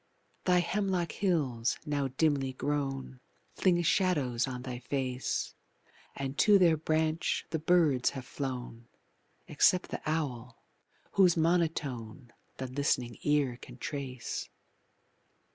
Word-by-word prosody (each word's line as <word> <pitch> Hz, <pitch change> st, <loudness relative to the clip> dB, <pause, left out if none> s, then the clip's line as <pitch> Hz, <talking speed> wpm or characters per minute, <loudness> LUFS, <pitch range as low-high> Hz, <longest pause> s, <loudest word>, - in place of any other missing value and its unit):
Thy 180 Hz, -1 st, +4 dB
hemlock 185 Hz, -2 st, -1 dB
hills, 140 Hz, -, 0 dB
now 145 Hz, -2 st, 0 dB
dimly 135 Hz, -1 st, +1 dB
grown, 135 Hz, -2 st, -3 dB, 0.3 s
Fling 175 Hz, -2 st, +2 dB
shadows 145 Hz, -9 st, +2 dB
on 125 Hz, -1 st, -5 dB
thy 125 Hz, -2 st, -5 dB
face, 130 Hz, -1 st, -2 dB, 0.6 s
And 140 Hz, 0 st, -4 dB
to 210 Hz, -1 st, +7 dB
their 175 Hz, -4 st, +5 dB
branch 155 Hz, +1 st, 0 dB
the 160 Hz, -, -1 dB
birds 155 Hz, -6 st, +3 dB
have 130 Hz, -, -6 dB
flown, 125 Hz, -4 st, -5 dB, 0.6 s
Except 185 Hz, 0 st, +3 dB
the -, -, -4 dB
owl, 125 Hz, -7 st, -3 dB, 0.5 s
whose 180 Hz, -4 st, +4 dB
monotone 145 Hz, -8 st, -1 dB, 0.2 s
The 130 Hz, -, -4 dB
listening 125 Hz, -2 st, -1 dB
ear 145 Hz, -5 st, +1 dB
can 125 Hz, -, -11 dB
trace. 130 Hz, -3 st, -5 dB
140 Hz, 110 wpm, -31 LUFS, 125-165 Hz, 0.6 s, to